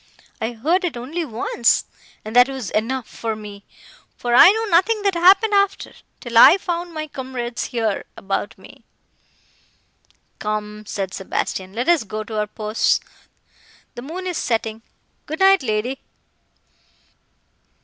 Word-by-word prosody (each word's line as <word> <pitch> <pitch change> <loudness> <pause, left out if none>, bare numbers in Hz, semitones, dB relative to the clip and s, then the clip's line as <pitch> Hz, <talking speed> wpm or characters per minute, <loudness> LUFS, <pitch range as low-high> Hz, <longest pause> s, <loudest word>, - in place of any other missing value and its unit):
I 225 +2 -2
heard 320 - 0
it 340 -8 -2
only 295 +9 -4
once, 235 -3 +1 0.4
and 215 +2 -7
that 245 +2 +6
was 260 -7 -5
enough 235 +3 -2
for 225 -1 -4
me; 205 -1 -10 0.5
for 240 -1 -2
I 250 - +9
know 445 +3 +1
nothing 410 +3 +2
that 395 -1 +2
happened 385 +5 +5
after, 400 -1 +1 0.3
till 235 -2 +1
I 350 - +9
found 350 -2 -4
my 310 0 -3
comrades, 255 -4 -5
here, 225 -4 -2
about 195 +1 -3
me." - - -16 1.6
"Come," 210 0 -4
said 190 -3 -4
Sebastian, 190 0 -4
"let 240 +3 -3
us 340 -5 +4
go 215 +1 -5
to 215 0 -4
our 210 - -1
posts—the 215 +2 -4
moon 335 +8 -7
is 360 -3 -3
setting. 225 -1 -2 0.5
Good 315 +1 -5
night, 385 0 +5
lady!" 240 +2 -2
245 Hz, 140 wpm, -21 LUFS, 215-345 Hz, 1.6 s, I